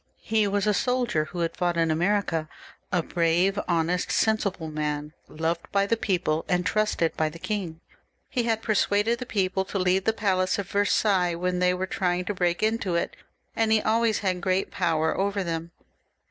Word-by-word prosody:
He 220 -2 +2
was 200 0 0
a 210 - +3
soldier 245 -11 +1
who 175 +3 -5
had 165 - -1
fought 175 -1 0
in 165 -1 +2
America, 170 -2 0 0.4
a 175 -2 +1
brave, 175 +4 +1
honest, 175 +1 0
sensible 200 -6 +1
man, 150 0 -3
loved 165 +2 -3
by 200 0 +2
the 230 - +1
people 180 -7 0
and 180 0 +1
trusted 210 -4 +1
by 155 -1 +1
the 160 - -10
king. 170 -4 -4 0.5
He 250 - -1
had 225 -1 0
persuaded 215 +2 +2
the 250 - -6
people 190 -2 0
to 200 - -4
leave 185 0 +1
the 220 - +4
palace 185 -4 +1
of 200 -3 -5
Versailles 200 -3 +2
when 180 +1 -1
they 180 0 +3
were 185 +1 -2
trying 180 -1 -1
to 205 - -2
break 175 0 0
into 215 -5 0
it, 170 - -1 0.4
and 225 -1 +1
he 220 - +5
always 225 0 +2
had 185 -1 0
great 185 0 0
power 160 -1 +1
over 200 0 0
them. 165 -1 -3
185 Hz, 185 wpm, -26 LUFS, 170-205 Hz, 0.5 s, he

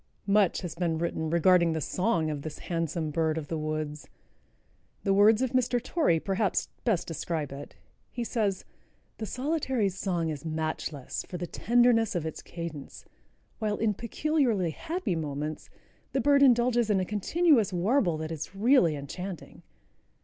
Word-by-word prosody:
Much 200 -2 +3
has 175 -3 -5
been 170 -2 -1
written 160 -1 -2
regarding 170 0 +4
the 160 - -1
song 170 -1 0
of 145 -2 -4
this 155 +1 -6 0.2
handsome 165 -1 -1
bird 160 0 0
of 150 -3 -5
the 165 - -2
woods. 155 -1 -4 1.0
The 195 - +2
words 210 +4 +5
of 255 - -1
Mr. 250 -1 +2
Torrey 250 - +1
perhaps 195 +2 0 0.2
best 215 -8 +1
describe 160 -2 -3
it. 140 +1 -9 0.3
He 240 - -4
says: 210 -5 -1 0.5
"The 220 - -4
Solitary's 255 - -1
song 175 -4 -1
is 150 -3 -5
matchless 155 -3 -3
for 180 - -4
the 175 - -3
tenderness 230 +2 +3
of 170 -3 -1
its 160 - -5
cadence, 165 -5 -8 0.5
while 215 -2 -1
in 220 -1 +1
peculiarly 235 - 0
happy 335 - -3
moments 150 -1 -4 0.4
the 270 - +1
bird 280 +2 +4
indulges 240 -3 +4
in 200 -2 +3
a 185 - 0
continuous 225 - +2
warble 180 - +1
that 155 +1 -5
is 160 +4 -6
really 205 - +4
enchanting." 170 +5 -7
185 Hz, 155 wpm, -28 LUFS, 160-230 Hz, 1.0 s, words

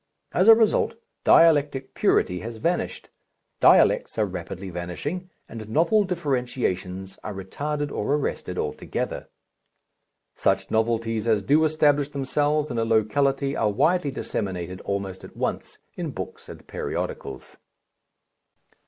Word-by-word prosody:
As 185 +4 +2
a 225 - +11
result, 220 0 +2 0.3
dialectic 145 -5 +4
purity 90 0 +2
has 115 +4 -7
vanished, 170 +10 -2 0.5
dialects - - +4
are - - +3
rapidly 95 +1 -6
vanishing, 115 - -5 0.2
and 110 -2 -8
novel 185 - +3
differentiations 125 - -2
are 105 - -5
retarded 145 +10 -3
or 145 - 0
arrested 90 -10 -3
altogether. 75 0 -3 1.0
Such - - 0
novelties 115 0 0
as 110 -3 +2
do 150 +8 +4
establish 145 -2 +2
themselves 145 +1 0
in 120 - -1
a - - +2
locality 135 +5 +1
are 110 - +1
widely 155 - +2
disseminated 90 -8 -4
almost 100 -1 -4
at - - -12
once - - -3 0.2
in - - -4
books - - -7
and - - -11
periodicals. 65 -1 -5
125 Hz, 120 wpm, -25 LUFS, 100-150 Hz, 1.0 s, a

